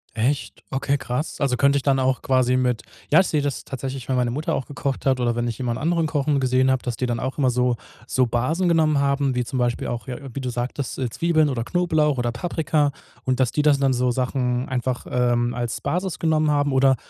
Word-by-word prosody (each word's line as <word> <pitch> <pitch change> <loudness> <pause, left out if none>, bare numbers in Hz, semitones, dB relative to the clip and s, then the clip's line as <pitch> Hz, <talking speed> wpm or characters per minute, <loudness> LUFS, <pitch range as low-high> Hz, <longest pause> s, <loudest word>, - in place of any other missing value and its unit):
Echt? 130 +6 -1
Okay, 135 +1 0
krass. 140 +4 -4
Also, 140 -3 +1
könnt 140 +3 +3
ich 140 - 0
dann 135 -2 +2
auch 130 0 +1
quasi 130 -1 +2
mit 125 -2 +1 0.3
ja, 155 - +7
ich 190 - +3
sehe 150 - +1
das 145 -2 -2
tatsächlich, 135 -1 -6
wenn 130 - +1
meine 125 -1 +1
Mutter 150 +6 -1
auch 130 - -3
gekocht 140 -1 -4
hat 130 -2 +2
oder 120 -1 +1
wenn 120 0 -1
ich 115 -2 -3
jemand 120 -2 -1
anderen 165 +2 +1
Kochen 145 -1 +1
gesehen 130 0 +3
habe, 130 -1 +1
dass 120 -2 -4
die 130 - -1
dann 120 -2 -1
auch 130 - -3
immer 130 -3 +3
so 125 0 +1 0.3
so 130 +1 +2
Basen 130 +10 0
genommen 155 -3 +3
haben, 140 -1 +1
wie 125 - +1
zum 130 +1 -3
Beispiel 120 -1 0
auch 120 0 -4
ja, 125 -2 -4 0.2
wie 140 - -4
du 125 - -3
sagtest, 125 +2 -3
äh, 130 -2 -1
Zwiebeln 155 +3 +2
oder 120 -4 -2
Knoblauch 155 -1 +1
oder 120 -1 0
Paprika 150 +2 0 0.3
und, 130 -1 0
dass 130 -2 +2
die, 150 - +1
das 145 -2 +4
dann 135 -1 +3
so 125 0 +1
Sachen 125 0 -1
einfach, 130 -1 -2
ähm, 120 -1 +1
als 120 -1 -3
Basis 180 0 -2
genommen 155 -2 +2
haben 145 -1 +1
oder 135 0 +4
130 Hz, 235 wpm, -23 LUFS, 125-145 Hz, 0.3 s, ja